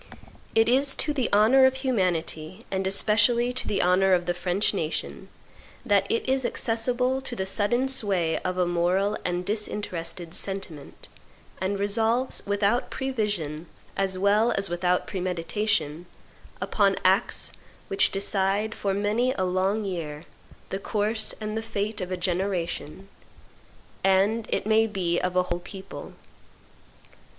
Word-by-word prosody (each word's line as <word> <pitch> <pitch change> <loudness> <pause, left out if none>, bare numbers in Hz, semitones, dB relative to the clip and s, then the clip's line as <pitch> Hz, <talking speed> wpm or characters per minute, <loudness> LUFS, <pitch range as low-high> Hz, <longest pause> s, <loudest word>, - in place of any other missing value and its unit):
It 225 0 +5
is 270 +3 +3
to 300 - 0
the 260 -5 0
honor 235 +6 +6
of 260 - 0
humanity, 185 - -1
and 190 0 -1
especially 225 +5 +3
to 255 - -3
the 205 - +1
honor 185 +2 +4
of 175 -1 +2
the 175 - 0
French 180 +4 0
nation, 160 -5 -3 0.6
that 200 -3 +3
it 230 - 0
is 265 0 +1
accessible 250 +3 0
to 255 -2 -6
the 190 - -2
sudden 230 +6 +1
sway 195 -11 +1
of 185 0 -3
a 180 - +3
moral 180 +4 +1
and 180 0 -2
disinterested 180 -5 -3
sentiment, 190 -8 -4 0.5
and 190 +2 -1
resolves, 225 +5 +1
without 205 +4 +1
prevision 205 - -2 0.3
as 190 -1 0
well 205 +4 +3
as 195 -1 0
without 180 +1 +1
premeditation, 180 -2 -1 0.5
upon 200 -2 +2
acts 190 +5 +2 0.4
which 195 - +3
decide, 200 +2 0
for 195 -1 -1
many 215 +5 +1
a 190 - -1
long 190 +4 0
year, 160 -5 -4 0.5
the 190 - -3
course 215 +2 -1
and 215 0 -4
the 220 - -1
fate 215 -1 -3
of 180 - -4
a 185 - -1
generation, 180 -1 -2 1.0
and, 195 +4 +3
it - - 0
may 220 +1 +4
be, 180 -5 -1
of 180 0 -2
a 180 - +4
whole 175 -1 -3
people. 190 +2 -9
195 Hz, 140 wpm, -26 LUFS, 180-220 Hz, 1.0 s, honor